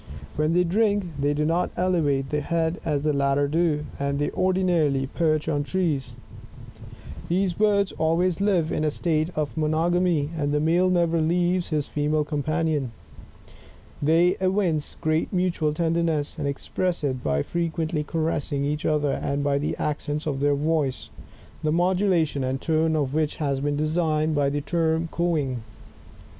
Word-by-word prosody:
When 155 +2 +1
they 180 +1 +4
drink, 205 +1 +1
they 145 +1 +1
do 150 +1 0
not 170 +3 +1
elevate 150 -7 +1
the 150 0 0
head 165 +2 -1
as 150 -4 -1
the 150 -1 +1
latter 140 0 +2
do, 155 -1 +1
and 140 0 -1
they 145 - -1
ordinarily 175 -7 +1
perch 155 +2 0
on 145 -3 +1
trees. 155 -6 -1 1.2
These 185 +1 +1
birds 200 0 +2
always 170 +3 0
live' 185 -6 +2
in - - -1
a 155 - +2
state 155 +1 0
of 150 -2 -2
monogamy, 160 0 +1
and 145 -2 -1
the 150 - +1
male 170 +4 +3
never 170 -2 +2
leaves 175 +2 +1
his 150 -3 0
female 150 +1 0
companion. 150 -3 -1 1.1
They 165 +4 +4
evince 185 -5 0
great 155 0 0
mutual 180 -4 0
tenderness 165 -2 0
and 145 - -1
express 170 +4 -2
it 130 -3 -2
by 70 -1 +1
frequently 165 -2 -2
caressing 150 -3 -1
each 150 +1 -1
other, 150 -2 +1
and 140 +1 -2
by 140 0 +1
the 150 - -2
accents 150 0 -2
of 140 -3 -2
their 145 0 +2
voice, 150 -2 -1 0.5
the 155 - 0
modulation 175 -4 +1
and 130 +1 -1
tone 160 0 +1
of 140 -3 -1
which 155 -1 0
have 140 -3 -1
been 145 0 0
designated 155 0 +1
by 145 -2 +2
the 145 +1 -2
term 165 +1 0
cooing. 150 -8 -1
155 Hz, 155 wpm, -25 LUFS, 145-170 Hz, 1.2 s, they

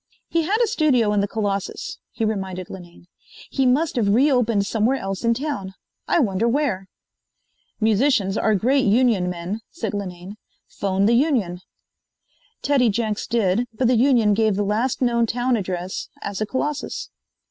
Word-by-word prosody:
"He 335 - +1
had 385 +7 +1
a - - +2
studio 280 - +2
in 205 - +2
the 200 - +1
Colossus," 200 -2 -3
he 225 - -2
reminded 190 -4 -3
Linane. 175 -2 -11 0.5
"He 270 -2 +1
must 290 +5 +2
have 215 -4 +2
re 280 +5 +4
opened 230 -6 +2
somewhere 225 +5 +1
else 195 -1 -4
in 230 0 +2
town. 250 -9 -4 0.3
I - - +2
wonder 225 - +1
where." 235 -8 0 0.9
"Musicians 220 -2 +2
are 215 -1 +2
great 260 +7 +2
union 215 -4 +3
men," 180 +4 -4
said 340 - -5
Linane. 190 0 -6 0.3
"Phone 195 0 -1
the 230 - +4
union." 235 - +1 1.0
Teddy 270 -5 +3
Jenks 215 0 -2
did, 230 +1 +1
but 250 +2 +1
the 250 - +3
union 235 -4 +4
gave 215 -1 +2
the 205 - 0
last 225 +6 0
known 235 -1 +2
town 245 +2 0
address 185 -3 -4
as 200 -1 -4
the 215 - -1
Colossus. 290 +4 -3
220 Hz, 160 wpm, -22 LUFS, 195-255 Hz, 1.0 s, re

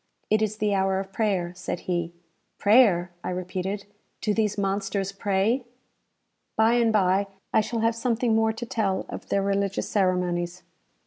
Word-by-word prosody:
"It 215 0 +4
is 215 0 0
the 210 -1 +1
hour 190 0 +1
of 195 0 -7
prayer," 190 -6 0
said 180 -1 -5
he. 175 -2 -2 0.5
"Prayer!" 200 -5 +4
I - - -3
repeated. 185 +2 -3 0.3
"Do 210 - 0
these 210 -1 0
monsters 195 0 -1
pray?" 200 +5 +1 0.9
By 220 +1 +4
and 235 -2 +3
bye, 195 -1 +3 0.3
I - - +5
shall 220 +1 -3
have 230 0 +3
something 230 0 +1
more 220 0 +3
to 225 +2 -6
tell 205 -5 -1
of - - -8
their 200 - +1
religious 200 0 0
ceremonies. 180 -2 0
200 Hz, 155 wpm, -26 LUFS, 185-220 Hz, 0.9 s, I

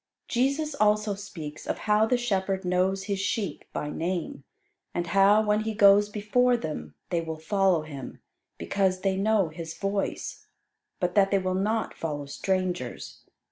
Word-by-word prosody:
Jesus 275 +5 0
also 210 -4 +2
speaks 180 -7 -8
of - - -1
how 215 +1 +4
the 250 - +2
shepherd 195 -5 -1
knows 185 +2 +1
his 200 -1 -2
sheep 200 +1 -2
by 150 - -3
name; 170 -4 -3 0.5
and 175 - 0
how, 200 +3 +5
when 210 0 +2
he 220 0 -3
goes 205 0 +6
before 240 +4 +2
them, 75 - -6 0.2
they 170 - +1
will 160 -1 -5
follow 185 0 +2
him, 140 -4 -8 0.4
because 190 -2 0
they 195 -1 +1
know 200 -2 +2
his 165 +1 -7
voice, 195 0 -3 0.5
but 180 -1 0
that 195 -1 +4
they 200 - +3
will 185 -1 -1
not 215 +4 0
follow 145 -3 -4
strangers. 180 -3 -3
195 Hz, 155 wpm, -27 LUFS, 175-210 Hz, 0.5 s, goes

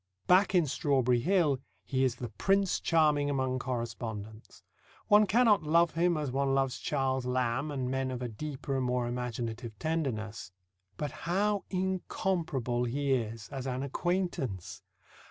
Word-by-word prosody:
Back 185 +2 +4
in 175 -3 +5
Strawberry 130 -3 +2
Hill, 160 -2 +2 0.3
he 130 -1 0
is 130 -2 +2
the 120 -2 -6
Prince 195 - +1
Charming 150 -3 +3
among 130 -2 0
correspondents. 115 -3 -5 0.5
One 210 0 +6
cannot 225 -1 +4
love 165 +2 +3
him 170 0 +2
as 150 -4 -2
one 135 +1 +1
loves 135 -1 0
Charles 135 -2 0
Lamb 125 +3 0
and 135 -3 -2
men 130 0 -1
of 125 -1 -4
a - - -1
deeper 135 +3 -5
and 130 - 0
more 125 -1 0
imaginative 120 -2 -4
tenderness. 110 - -3 0.5
But 150 -2 -3 0.2
how 205 +2 +1
incomparable 175 - -1
he 140 +3 -1
is 115 -3 -2
as 135 -1 -5
an 130 +1 -2
acquaintance! 150 - -2
135 Hz, 145 wpm, -30 LUFS, 125-165 Hz, 0.5 s, One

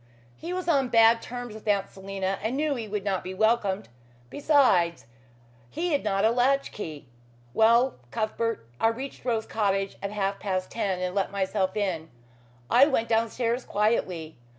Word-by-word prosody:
"He 335 - -7
was 365 0 -3
on 275 -6 +2
bad 230 0 +5
terms 245 -2 -7
with 220 0 -11
Aunt 200 -2 +2
Selina 195 0 -4
and 225 +5 -2
knew 300 0 +1
he 235 -5 -5
would 205 -1 -3
not 195 -2 -1
be 185 +1 -6
welcomed. 215 -2 +1 0.4
Besides, 195 - +3 0.6
he 345 - -2
had 285 - +1
not 200 -1 +1
a 225 - +4
latch 265 +3 +2
key. 155 -8 -7 0.5
Well, 235 - +4
Cuthbert, 220 - -2
I - - +4
reached 260 +5 -4
Rose 225 -3 0
Cottage 195 -2 -1
at 200 - -3
half 200 -1 -2
past 185 -2 -2
ten 195 -5 -1
and 180 0 -2
let 195 -1 0
myself 195 0 -1
in. 175 -6 -2 0.6
I 260 - +6
went 230 -6 0
downstairs 230 +2 0
quietly. 185 - -1
215 Hz, 165 wpm, -27 LUFS, 195-240 Hz, 0.6 s, I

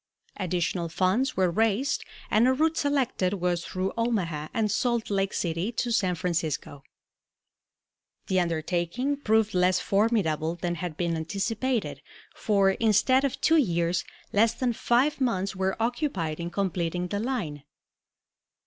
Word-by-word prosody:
Additional 175 -2 -1
funds 185 - +1
were 185 -2 +3
raised 225 +7 +1 0.3
and 225 +3 +4
a 260 - +4
route 315 +4 +1
selected 270 - 0
was 175 -2 -1
through 185 +1 -3
Omaha 185 -10 -1
and 215 -2 0
Salt 235 -2 0
Lake 195 -1 +1
City 170 +5 -2
to 240 +1 -1
San 185 -5 +1
Francisco. 165 -5 -2 1.4
The 190 -1 +1
undertaking 175 - -1
proved 220 -5 +2
less 180 0 +3
formidable 195 -7 +1
than 175 0 -2
had 170 -2 -5
been 170 -2 0
anticipated, 200 - -2 0.3
for, 200 -2 +2
instead 230 +6 +3
of 275 - -1
two 325 - +4
years, 170 - +1 0.3
less 220 +2 +3
than 250 -2 0
five 260 +6 +1
months 195 -6 0
were 190 0 -1
occupied 225 - -1
in 170 0 -3
completing 180 -1 -2
the 200 - -2
line. 205 - -3
195 Hz, 135 wpm, -27 LUFS, 175-235 Hz, 1.4 s, and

